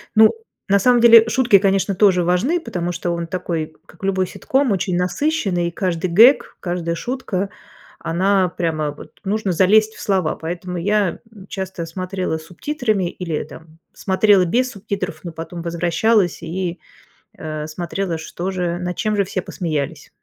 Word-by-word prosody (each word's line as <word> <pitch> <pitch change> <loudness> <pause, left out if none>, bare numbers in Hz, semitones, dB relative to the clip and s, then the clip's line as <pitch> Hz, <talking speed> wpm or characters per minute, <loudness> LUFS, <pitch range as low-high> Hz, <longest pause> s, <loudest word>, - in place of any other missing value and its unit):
Ну, 220 0 +8 0.4
на 200 +1 +4
самом 245 +4 +4
деле, 230 -1 +8
шутки, 240 -5 +4
конечно, 195 0 +1
тоже 185 -2 +4
важны, 235 - +1
потому 175 - -3
что 175 0 -3
он 170 0 -2
такой, 165 -3 -3
как - - -19
любой 190 -1 +1
ситком, 265 +4 0
очень 185 -1 -1
насыщенный, 185 - 0
и - - -4
каждый 175 0 -2
гэг, 230 +10 +5
каждая 175 -2 -2
шутка, 200 -4 -3 0.5
она 190 +2 +1
прямо, 160 -4 -2
вот, 145 - -12
нужно 200 -1 -1
залезть 215 +5 +4
в - - -13
слова, 185 -6 0
поэтому 175 +2 -5
я, 205 0 +1
м, 200 -3 -13
часто 190 -3 -5
смотрела 185 0 -3
с - - -12
субтитрами 215 - -1
или 170 -4 -4
там 160 +2 -14
смотрела 195 0 +3
без 245 +8 +1
субтитров, 195 -6 -5
но 170 - -6
потом 165 +1 -7
возвращалась 175 +3 +1
и, 175 -1 -4 0.6
э, 155 -1 -5
смотрела, 170 +2 -3
что 175 +3 -5
же, 175 -2 -2
над 180 -1 -4
чем 215 -1 0
же 200 - +2
все 185 0 -3
посмеялись. 155 -5 -4
185 Hz, 160 wpm, -20 LUFS, 170-205 Hz, 0.6 s, Ну